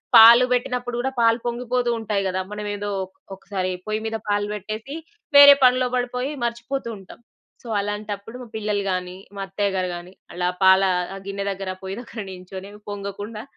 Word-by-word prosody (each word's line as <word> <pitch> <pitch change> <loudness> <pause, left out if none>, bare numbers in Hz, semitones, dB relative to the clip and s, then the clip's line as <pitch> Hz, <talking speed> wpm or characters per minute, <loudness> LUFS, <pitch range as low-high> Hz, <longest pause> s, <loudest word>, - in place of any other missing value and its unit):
పాలు 235 +2 +10
బెట్టినప్పుడు 245 -1 -1
గూడా 265 +2 0
పాలు 230 +1 +4
పొంగిపోతూ 245 0 -1
ఉంటాయి 205 -2 -1
గదా! 185 0 -1
మనమేదో 205 0 -4 0.2
ఒకొక్కసారి 190 0 -5 0.2
పొయ్యి 215 0 -1
మీద 225 0 -2
పాలు 205 0 +1
బెట్టేసి, 215 +7 -6 0.4
వేరే 285 0 +11
పనిలో 255 0 +5
బడిపోయి 250 +3 -1
మర్చిపోతూ 235 +2 -3
ఉంటాం. 190 +3 -14 0.4
సో, - - -11
అలాంటప్పుడు 205 +2 -4
మా 245 - -9
పిల్లలు 210 -2 -1
గానీ, 180 0 -3 0.2
మా 195 - -5
అత్తయ్య 200 +1 -1
గారు 185 -1 0
గానీ, 175 +2 -10 0.2
అలా 180 0 -1 0.2
పాలా 190 0 +6 0.3
ఆహ్, 195 - -8
గిన్నె 200 0 -3
దగ్గర, 190 -1 -4
పొయ్యి 190 +2 -5
దగ్గర 230 -2 -8
నించొని 185 +1 -9 0.2
పొంగకుండా, 205 +2 -6
210 Hz, 160 wpm, -23 LUFS, 195-235 Hz, 0.4 s, వేరే